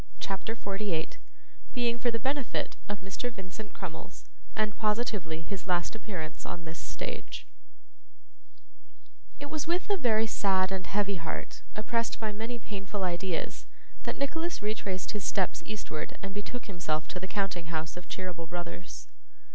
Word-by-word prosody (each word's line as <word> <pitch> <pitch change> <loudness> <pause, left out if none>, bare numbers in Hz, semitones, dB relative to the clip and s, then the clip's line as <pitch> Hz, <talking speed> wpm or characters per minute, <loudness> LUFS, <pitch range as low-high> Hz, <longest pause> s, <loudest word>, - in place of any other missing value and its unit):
CHAPTER 195 +3 0
48 195 -6 0 0.6
Being 240 -1 +4
for 240 - +4
the 230 - +3
Benefit 270 +3 +1
of 205 -1 -1
Mr. 195 +6 -1
Vincent 195 0 -6
Crummles, - - -5 0.3
and 215 -1 +3
positively 210 -7 +2
his 195 +1 -3
last 175 -2 +3
Appearance 190 -8 -3
on 175 -1 -4
this 160 0 -4
Stage - - -3 1.9
It 285 0 -4
was 310 -1 0
with 350 +2 +3
a 400 - +6
very 225 -7 +5
sad 190 -3 +4
and 190 -1 0
heavy 200 -1 +3
heart, 165 -1 -3
oppressed 230 +2 +2
by 220 -1 +1
many 225 +4 -1
painful 200 -2 -2
ideas, 175 -1 +1 0.3
that - - -1
Nicholas 325 +5 +1
retraced 200 -3 +1
his 210 -2 -1
steps 190 -1 +3
eastward 205 -7 -2
and 195 0 -2
betook 205 +4 -3
himself 160 -6 +1
to 180 - -1
the 190 - -2
counting 190 -4 +1
house 160 -1 -1
of 180 0 -7
Cheeryble 180 -3 -2
Brothers. 170 - -4
200 Hz, 145 wpm, -33 LUFS, 180-225 Hz, 1.9 s, a